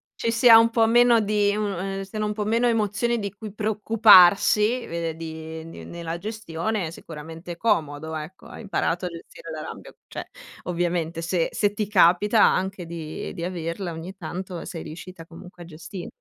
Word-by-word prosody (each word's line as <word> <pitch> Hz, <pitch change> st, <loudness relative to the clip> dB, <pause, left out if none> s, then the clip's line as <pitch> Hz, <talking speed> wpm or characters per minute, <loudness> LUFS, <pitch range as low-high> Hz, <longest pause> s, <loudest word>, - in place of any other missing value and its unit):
ci 230 Hz, -, -1 dB
sia 230 Hz, -1 st, +8 dB
un 230 Hz, 0 st, +5 dB
po' 230 Hz, -1 st, +3 dB
meno 240 Hz, 0 st, +5 dB
di 205 Hz, -1 st, +1 dB
uno 205 Hz, -4 st, -2 dB
ehm, 195 Hz, +1 st, -4 dB
siano 210 Hz, +2 st, -4 dB
un 210 Hz, -, -2 dB
po' 210 Hz, -1 st, -3 dB
meno 230 Hz, +3 st, +2 dB
emozioni 225 Hz, +1 st, 0 dB
di 200 Hz, -2 st, -4 dB
cui 205 Hz, 0 st, -9 dB
preoccuparsi, 210 Hz, +1 st, +5 dB
vede 165 Hz, -1 st, -4 dB
di 160 Hz, 0 st, -7 dB
ehm, 165 Hz, +1 st, -10 dB
di -, -, -10 dB
nella 170 Hz, -1 st, -6 dB
gestione, 210 Hz, -1 st, -3 dB
è -, -, -7 dB
sicuramente 165 Hz, +2 st, -9 dB
comodo 160 Hz, -6 st, -1 dB
ecco. 155 Hz, +5 st, -8 dB
Hai -, -, -10 dB
imparato 185 Hz, -3 st, -1 dB
a -, -, -2 dB
gestire 170 Hz, -, -11 dB
la -, -, -6 dB
rabbia, -, -, -9 dB
cioè -, -, -8 dB, 0.3 s
ovviamente 170 Hz, -1 st, -2 dB
se 170 Hz, 0 st, 0 dB
se 205 Hz, -1 st, 0 dB
ti 210 Hz, -1 st, -2 dB
capita 205 Hz, +3 st, +4 dB
anche 190 Hz, -1 st, +2 dB
di 165 Hz, 0 st, -6 dB
di 170 Hz, -3 st, -6 dB
averla 175 Hz, 0 st, -4 dB
ogni 165 Hz, +4 st, -8 dB
tanto 180 Hz, 0 st, -6 dB
sei 165 Hz, -, -7 dB
riuscita 165 Hz, +2 st, -10 dB
comunque 175 Hz, +1 st, -12 dB
a -, -, -12 dB
gesti 170 Hz, +3 st, -9 dB
185 Hz, 180 wpm, -24 LUFS, 165-210 Hz, 0.3 s, sia